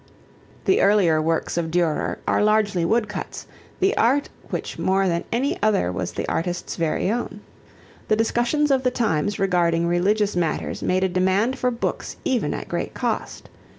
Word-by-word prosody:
The 380 - +3
earlier 190 -6 +4
works 165 +2 -1
of 165 -1 -1
Durer 170 -2 0
are - - +2
largely 210 -4 +2
wood 220 +6 +2
cuts, 210 - -6 0.3
the 385 +1 +2
art 265 +5 +2 0.2
which - - -4
more 190 +1 +2
than 170 -1 -1
any 255 +5 -1
other 205 - +2
was - - -4
the - - -3
artist's 175 +1 -2
very 165 +3 0
own. 220 -3 -3 0.7
The 215 - +3
discussions 240 +6 +1
of 265 -1 +3
the 255 - +2
times 205 -6 0
regarding 175 -4 +2
religious 200 +4 +1
matters 170 -3 -1
made 185 +1 +1
a - - +3
demand 190 +7 +1
for 250 - +2
books 235 -1 -3
even 250 -3 0
at - - -6
great - - -3
cost. - - -3
200 Hz, 165 wpm, -23 LUFS, 175-230 Hz, 0.7 s, earlier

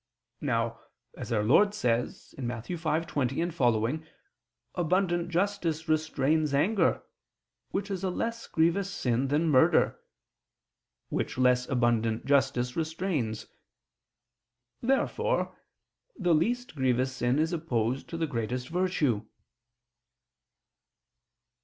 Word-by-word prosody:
Now, - - -1 0.4
as - - -7
Our 105 -2 +2
Lord 200 - +4
says 120 - -1
(Matt. 120 -3 -4
5:20, 165 -2 -1
seqq.) 125 0 +1 0.7
abundant 175 0 +1
justice 175 -3 -1
restrains 155 -1 +1
anger, 195 +9 +2 0.7
which 200 +1 -3
is 190 -1 -3
a 190 - +1
less 230 +5 -3
grievous 170 +4 +1
sin 125 -6 0
than 150 +4 +1
murder, 130 - +4 1.1
which - - -2
less 125 -1 +3
abundant 115 -3 +1
justice 125 -3 +2
restrains. 160 - -2 1.4
Therefore 265 +3 0 0.6
the 180 -5 +2
least 240 +10 0
grievous 130 -1 +1
sin 120 +2 +1
is 160 +3 +1
opposed 130 -6 -1
to 165 - -4
the 165 - 0
greatest 125 -1 -3
virtue. 160 - 0
155 Hz, 100 wpm, -29 LUFS, 125-175 Hz, 1.4 s, Lord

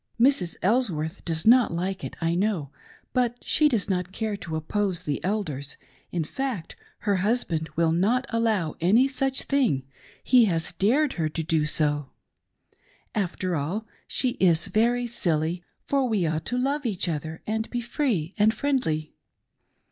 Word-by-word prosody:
Mrs. 235 -9 +3
Elsworth 190 -6 0
does 160 -2 -2
not 245 +2 +6
like 185 +3 -3
it, - - -5
I 165 0 +1
know, 180 -6 0 0.4
but 245 -1 +1
she 305 -1 +4
does 225 -8 0
not 180 -2 -1
care 215 +1 -2
to 170 -5 -6
oppose 180 +3 -1
the 145 -4 -3
Elders; 160 -9 -2 0.2
— - - -33
^in 170 -3 -1
fact 245 - -4 0.3
her 205 -2 +1
hus 220 +7 +1
band 160 -2 -3
will 165 -1 +3
not 210 +10 +2
allow 220 -9 +1
any 220 +10 +5
such 270 -1 -1
thing 250 - +1 0.2
— - - -25
he 245 -2 +8
has 165 -5 0
dared 250 - +2
her 160 -3 -1
to 160 +1 -3
do 160 -1 +1
so. 145 -2 0 1.0
After 185 -3 -1
all, 170 +10 -2 0.2
she 255 - 0
is 170 -3 +4
very 240 +3 +2
silly, 175 -6 -1 0.2
for 275 -3 +1
we 205 -6 +1
ought 160 0 -1
to 245 - -1
love 280 +4 0
each 195 -6 -1
other 160 0 -4
and 220 +1 -2
be 245 - -2
free 235 - -1
and 215 +2 +4
friendly. 220 - -1
190 Hz, 165 wpm, -26 LUFS, 160-240 Hz, 1.0 s, he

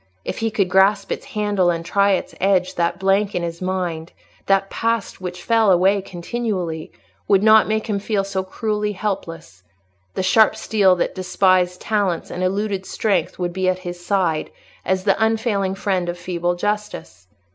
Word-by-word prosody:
If - - -4
he 225 0 0
could 210 -4 0
grasp 190 +3 +3
its - - -4
handle 205 -4 +2
and 165 -1 -2
try 200 +2 +3
its 185 - -2
edge, 185 -1 +2
that 170 0 0
blank 195 +2 +1
in 175 - -1
his 170 0 -5
mind—that 185 +2 -2
past 230 -4 -2
which 180 -1 -6
fell 225 -2 +3
away 190 +3 +3
continually—would 190 -1 -3
not 220 0 +6
make 220 0 -1
him 205 -2 -1
feel 200 -1 -1
so 195 -1 -2
cruelly 210 +1 -2
helpless: 170 - -5 0.5
the - - -1
sharp 215 +4 +4
steel 195 -4 +3
that 175 - -1
despised 185 -1 +1
talents 200 -6 -1
and 180 - -5
eluded 195 +1 -1
strength 195 -7 -1
would 175 -1 -3
be 185 0 0
at 185 - 0
his 175 0 -6
side, 175 -5 0 0.3
as 190 0 0
the 200 +2 +2
unfailing 220 -4 0
friend 190 -3 -1
of 175 - -4
feeble 175 0 -2
justice. 205 - -4
190 Hz, 165 wpm, -21 LUFS, 180-210 Hz, 0.5 s, not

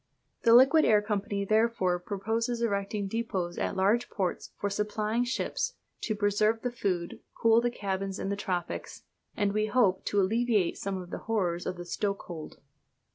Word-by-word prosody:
The 230 -1 +6
Liquid 275 +6 +7
Air 215 -1 +5
Company 205 -1 -2
therefore 215 -4 +2
proposes 225 +6 -2
erecting 200 -1 -1
depôts 195 -5 -3
at - - -1
large 205 +6 +2
ports 185 -4 -2
for 205 - 0
supplying 210 +3 -1
ships, 255 - -2 0.3
to 215 - -2
preserve 210 +2 +1
the 245 - -1
food, 185 -7 -2 0.2
cool 230 0 +5
the 240 - +1
cabins 195 -3 -3
in - - -3
the 200 - 0
tropics, 180 -4 -4 0.3
and, 205 -2 +1
we 215 0 +1
hope, 210 -4 +2
to 205 - +1
alleviate 215 -1 +1
some 195 -1 -3
of 180 -1 -9
the - - -4
horrors 180 -6 0
of 180 - -3
the 175 - -7
stokehold. 175 -4 -4
205 Hz, 165 wpm, -29 LUFS, 190-225 Hz, 0.3 s, Liquid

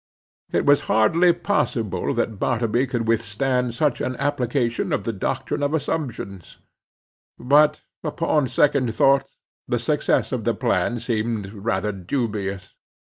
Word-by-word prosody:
It - - +1
was 145 0 +5
hardly 165 +12 +4
possible 155 - -1
that 110 -4 -1
Bartleby 120 +1 +1
could 120 -2 -2
withstand 120 +2 0
such 145 0 0
an 130 - -2
application 125 -3 -1
of - - 0
the 115 - -2
doctrine 130 +8 -2
of 145 +2 +1
assumptions. 120 - -4 0.8
But 150 +4 +3 0.2
upon 150 -2 0
second 130 -2 +2
thoughts 135 0 +2 0.3
the - - 0
success - - 0
of - - -2
the - - 0
plan 120 - 0
seemed 110 -3 -2
rather 105 -1 -1
dubious. 100 -1 -3
120 Hz, 130 wpm, -23 LUFS, 110-140 Hz, 0.8 s, was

